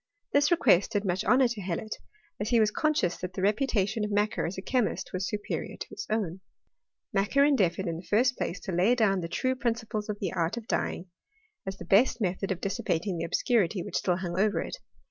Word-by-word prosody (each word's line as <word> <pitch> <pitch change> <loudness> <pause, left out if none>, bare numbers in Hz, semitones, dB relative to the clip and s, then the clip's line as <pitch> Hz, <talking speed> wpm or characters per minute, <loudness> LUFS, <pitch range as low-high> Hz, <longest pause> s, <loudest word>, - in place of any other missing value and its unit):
This 285 +1 +4
request 225 - +4
did 205 0 0
much 185 +2 0
honour 255 0 +5
to 230 -3 -4
Hellot, 190 +4 -3 0.5
as 210 +1 -2
he 235 - +4
was 215 -1 +3
conscious 300 - +1
that 180 0 -6
the 185 - -4
reputation 210 -1 +1
of 210 - -1
Macquer 210 -1 0
as 180 - -6
a - - -3
chemist 225 -7 -1
was 185 +1 -1
su 210 - -1
perior 205 - -5
to - - -5
his 410 - -7
own. 195 -5 -1 0.7
Macquer 205 +8 +3
endeavoured, 200 - +2
in 165 -1 -2
the 175 - -11
first 245 +4 +3
place, 180 - -3
to 190 - -5
lay 185 +8 +3
down 205 -5 +2
the 170 - -3
true 255 +9 0
principles 225 -4 -2
of 210 - -2
the 190 - -2
art 170 +6 -1
of 230 -1 -7
dyeing, 175 - -1 0.6
as 190 0 -4
the 175 - -9
best 205 +8 +4
method 190 -1 -1
of 185 - -2
dissipating 185 -2 -1
the - - -1
obscurity 195 0 +1
which - - -3
still 180 - +1
hung 180 -1 -3
over 210 +1 +2
it. - - -5
205 Hz, 220 wpm, -28 LUFS, 180-230 Hz, 0.7 s, honour